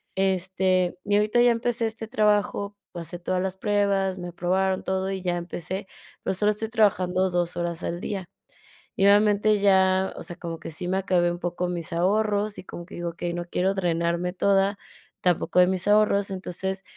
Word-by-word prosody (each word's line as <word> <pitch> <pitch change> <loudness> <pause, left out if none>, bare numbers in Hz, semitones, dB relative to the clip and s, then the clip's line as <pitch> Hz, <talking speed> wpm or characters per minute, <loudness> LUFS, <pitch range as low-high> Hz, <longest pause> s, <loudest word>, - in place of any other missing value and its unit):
Este, 185 -1 +1
y 205 0 +2
ahorita 210 +3 +3
ya 245 0 +6
empecé 235 0 0
este 225 0 -6
trabajo, 210 -2 +1 0.2
pasé 175 0 -5
todas 180 +1 -1
las 190 0 -3
pruebas, 200 -2 +1
me 175 - -5
aprobaron 185 +2 0
todo 190 0 -1
y 190 -1 -3
ya 180 -1 -1
empecé, 175 +3 -5 0.4
pero - - 0
solo 210 +3 +2
estoy 215 +1 -4
trabajando 190 -4 +2
2 175 -1 -1
horas 170 -1 -3
al 170 +1 -3
día. 195 -3 -4 0.7
Y 195 - +2
obviamente 210 +1 +4
ya, 190 -1 +3
o - - -7
sea, 175 0 -7
como 165 -2 -6
que - - -7
sí 170 +3 -5
me 190 - 0
acabé 180 -3 +2
un 175 - -4
poco 175 0 -2
mis 170 -2 -4
ahorros, 205 +4 +1
y - - -8
como 175 -2 -9
que - - -12
digo: 175 0 -3
"Okey, 170 +1 -4
no 175 - -3
quiero 190 +2 0
drenarme 170 -1 0
toda 195 +1 +2 0.4
tampoco 180 0 +1
de 180 - +7
mis 190 0 -1
ahorros". 205 -1 +3
Entonces, 190 +1 -4
190 Hz, 185 wpm, -25 LUFS, 175-205 Hz, 0.7 s, de